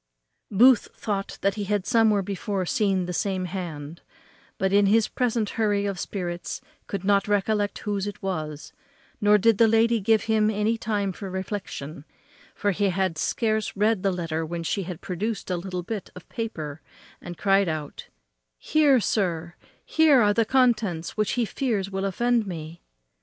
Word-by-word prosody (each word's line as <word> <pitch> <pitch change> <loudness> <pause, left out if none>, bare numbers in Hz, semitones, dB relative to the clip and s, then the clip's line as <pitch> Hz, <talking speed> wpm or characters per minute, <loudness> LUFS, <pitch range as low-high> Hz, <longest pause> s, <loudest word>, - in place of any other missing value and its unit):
Booth 235 +3 +5
thought 200 -2 -3 0.2
he 205 0 -4
had 205 -1 -1
somewhere 220 -3 +3
before 195 0 -3
seen 195 -3 +1
the 180 - -4
same 190 0 -1
hand, 170 -4 -6 0.6
but 190 0 0
in 200 0 +5
his 220 +2 +4
present 230 -4 -1
hurry 205 -2 +2
of 200 -3 -3
spirits 175 -3 -4 0.3
could 195 -2 -4
not 200 +1 +2
recollect 205 0 +1
whose 205 -1 -1
it 205 0 -6
was, 155 -6 -4 0.5
nor 210 0 +6
did 215 +1 +3
the 230 - +7
lady 225 +1 +3
give 215 +1 +2
him 215 -1 +2
any 215 +2 +1
time 210 -3 -1
for 195 +1 -7
reflection; 185 -6 -5 0.5
for 205 - 0
he 200 +1 +1
had 185 -2 0
scarce 215 +5 -1
read 210 -1 +2
the 195 - +1
letter 165 -3 -2
when 170 +1 -4
she 185 +3 -2
produced 195 +4 -4
a - - +1
little 180 0 -4
bit 210 +1 -5
of 180 - -12
paper 160 -10 -5 0.4
and 175 -1 -8
cried 195 -1 +3
out, 155 -2 -5 0.5
"Here, 290 - +3
sir, 175 -6 -1 0.3
here 315 -4 +5
are 205 0 +4
the 230 +1 +2
contents 220 -10 +1
which 215 -1 0
he 245 -2 +1
fears 215 -6 -2
will 195 0 -2
offend 235 +3 +1
me." 165 -2 -7
200 Hz, 165 wpm, -25 LUFS, 180-220 Hz, 0.6 s, the